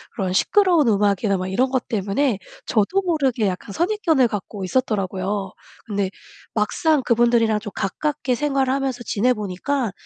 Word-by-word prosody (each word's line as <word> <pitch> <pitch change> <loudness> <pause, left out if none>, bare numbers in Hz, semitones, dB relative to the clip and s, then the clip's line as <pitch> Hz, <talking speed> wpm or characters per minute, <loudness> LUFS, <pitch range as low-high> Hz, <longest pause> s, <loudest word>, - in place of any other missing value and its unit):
그런 190 -6 -1
시끄러운 345 - +3
음악이나 200 -1 +2
막 185 - -3
이런 255 +7 +1
것 260 -2 -1
때문에 215 +3 0 0.3
저도 230 - +2
모르게 275 - +1
약간 190 +1 -4
선입견을 335 - +2
갖고 205 -1 -5
있었더라고요. 195 -3 -1 0.4
근데 200 -2 -1 0.4
막상 280 +7 +1
그분들이랑 235 -2 +3
좀 210 -2 -7
가깝게 255 +5 -1
생활하면서 270 -2 0
지내보니까 220 +2 0
230 Hz, 350 characters per minute, -22 LUFS, 200-275 Hz, 0.4 s, 시끄러운